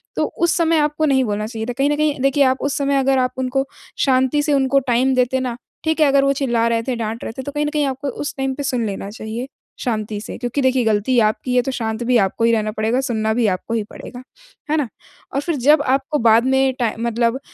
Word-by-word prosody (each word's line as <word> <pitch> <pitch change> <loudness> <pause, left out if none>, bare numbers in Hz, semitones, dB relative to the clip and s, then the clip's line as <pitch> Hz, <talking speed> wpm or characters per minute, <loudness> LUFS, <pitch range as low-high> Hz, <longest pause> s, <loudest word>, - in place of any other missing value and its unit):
तो - - +1
उस 340 -1 +2
समय 330 -1 +3
आपको 300 +1 +1
नहीं 270 -3 +3
बोलना 210 0 -2
चाहिए 220 -1 -5
था। 245 - -2
कहीं 275 +1 +2
न 295 - +1
कहीं 300 -1 0
देखिए 275 +1 +3
आप 260 -1 +3
उस 285 - -1
समय 280 0 +1
अगर 270 0 +2
आप 255 0 +1
उनको 260 +1 0 0.4
शांति 260 +2 +2
से 295 -1 +1
उनको 275 0 +3
टाइम 255 0 +1
देते 255 +1 +2
ना, 250 -2 -3 0.3
ठीक 320 0 0
है, 305 - +6
अगर 275 0 +4
वो 275 0 +3
चिल्ला 240 -4 +1
रहे 230 -1 0
थे, 255 +1 -2
डाँट 225 0 -4
रहे - - -4
थे - - -3
तो 285 - -5
कहीं 295 +1 -1
न - - 0
कहीं 300 -1 0
आपको 270 +1 -3
उस 290 +3 -5
टाइम 270 0 -1
पे 285 - -4
सुन 250 -4 -1
लेना 195 -1 -4
चाहिए 225 +3 -6 0.3
शांति 215 -4 -2
से - - -7
क्योंकि 245 +3 -2
देखिए 260 -1 +2
गलती 220 +3 +1
आपकी 225 +3 0
है 250 - +5
तो 270 - -2
शांत 225 -2 -3
भी 245 +1 +3
आपको 195 +1 0
ही 230 - +4
रहना 215 -1 0
पड़ेगा, 220 +3 0
सुनना 220 -4 -1
भी 230 -1 +1
आपको 190 +4 -2
ही 220 - 0
पड़ेगा। 245 0 -10 0.5
है 310 - +2
ना? 290 -6 0 0.5
और 275 - +1
फिर 335 +2 -2
जब 290 +3 +4
आपको 275 +2 0
बाद 230 +1 +4
में 265 0 +2
टाइ 230 -3 0
मतलब 235 +2 0
255 Hz, 255 wpm, -20 LUFS, 230-275 Hz, 0.5 s, है